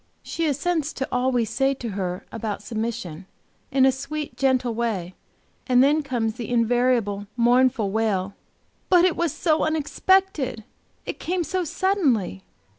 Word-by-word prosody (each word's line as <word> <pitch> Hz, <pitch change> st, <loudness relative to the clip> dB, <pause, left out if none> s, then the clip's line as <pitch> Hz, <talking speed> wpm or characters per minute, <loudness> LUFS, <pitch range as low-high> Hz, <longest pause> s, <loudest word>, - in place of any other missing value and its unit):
She 330 Hz, -1 st, -2 dB
assents 305 Hz, +2 st, -1 dB
to 265 Hz, -, -3 dB
all 250 Hz, +1 st, +1 dB
we 240 Hz, -2 st, +1 dB
say 270 Hz, +5 st, 0 dB
to 240 Hz, -3 st, -5 dB
her 185 Hz, -3 st, -4 dB
about 215 Hz, -2 st, -4 dB
submission, 215 Hz, -6 st, -4 dB, 0.4 s
in 265 Hz, 0 st, +4 dB
a 265 Hz, -, +5 dB
sweet, 285 Hz, +3 st, -5 dB
gentle 255 Hz, -3 st, +1 dB
way, 215 Hz, -6 st, -2 dB, 0.5 s
and 250 Hz, -1 st, +5 dB
then 295 Hz, +3 st, +3 dB
comes 240 Hz, -6 st, -1 dB
the 235 Hz, -4 st, -5 dB
invariable, 235 Hz, -4 st, +1 dB
mournful 245 Hz, -3 st, +3 dB
wail, 200 Hz, -3 st, 0 dB, 0.6 s
"But 360 Hz, -1 st, +6 dB
it 365 Hz, -, +2 dB
was 340 Hz, -3 st, 0 dB
so 315 Hz, 0 st, +1 dB
unexpected! 315 Hz, -, +1 dB, 0.4 s
It -, -, -5 dB
came 360 Hz, 0 st, -1 dB
so 365 Hz, +4 st, -1 dB
suddenly!" 310 Hz, -, 0 dB
250 Hz, 145 wpm, -24 LUFS, 220-300 Hz, 0.6 s, But